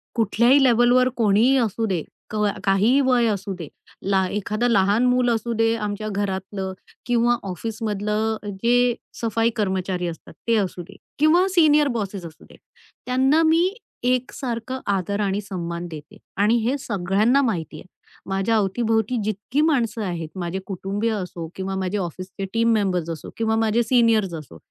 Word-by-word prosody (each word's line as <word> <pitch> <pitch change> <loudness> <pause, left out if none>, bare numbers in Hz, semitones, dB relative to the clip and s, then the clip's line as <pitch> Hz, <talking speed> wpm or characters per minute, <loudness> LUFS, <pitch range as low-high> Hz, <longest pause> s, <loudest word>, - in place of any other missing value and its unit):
कुठल्याही 235 +5 +4
लेव्हलवर 245 +1 +4
कोणीही 225 +4 +4
असू 225 -2 0
दे 185 -7 -1 0.3
कवा 210 -2 0
काहीही 205 +7 +3
वय 250 -2 +3
असू 200 -2 -2
दे. 170 -4 -7 0.3
ला 190 -1 +1
एखादं 210 +3 -1
लहान 205 +2 +3
मूल 250 0 +3
असू 235 0 -1
दे 225 0 +2
आमच्या 210 -1 -4
घरातलं 190 -1 -3 0.3
किंवा 240 0 +2
ऑफिसमधलं 215 +2 -2 0.3
जे 245 0 +3 0.3
सफाई 225 0 +1
कर्मचारी 190 -4 -1
असतात, 165 -1 -8
ते 230 - +3
असू 185 -3 -2
दे 195 - -15 0.2
किंवा 335 +5 +4
सीनियर 300 -3 +5
बॉसेस 195 -4 -4
असू 160 -2 -12
दे. - - -17 0.5
त्यांना 265 +5 +3
मी 330 +3 +4 0.4
एक 255 0 +1
सारखं 255 0 -4
आदर 200 +2 -2
आणि 200 0 0
सन्मान 175 -3 -5
देते 160 +4 -10 0.2
आणि 210 +4 +3
हे 255 +5 +1
सगळ्यांना 210 +4 +1
माहिती 175 - -2
आहे. - - -12 0.4
माझ्या 195 +4 +1
अवतीभोवती 220 +3 +1
जितकी 215 +7 -1
माणसं 240 -8 +1
आहेत, 170 -4 -4
माझे 175 +1 -3
कुटुंबीय 200 +3 -2
असो 180 -5 -5
किंवा 190 0 -4
माझे 190 +1 -2
ऑफिसचे 185 +1 -5
टीम 230 0 +3
मेंबर्स 185 -6 0
असो 165 -3 -6
किंवा 220 -1 +1
माझे 225 +1 +2
सीनियर्स 225 -5 +3
असो, 155 - -8
215 Hz, 155 wpm, -23 LUFS, 190-240 Hz, 0.5 s, सीनियर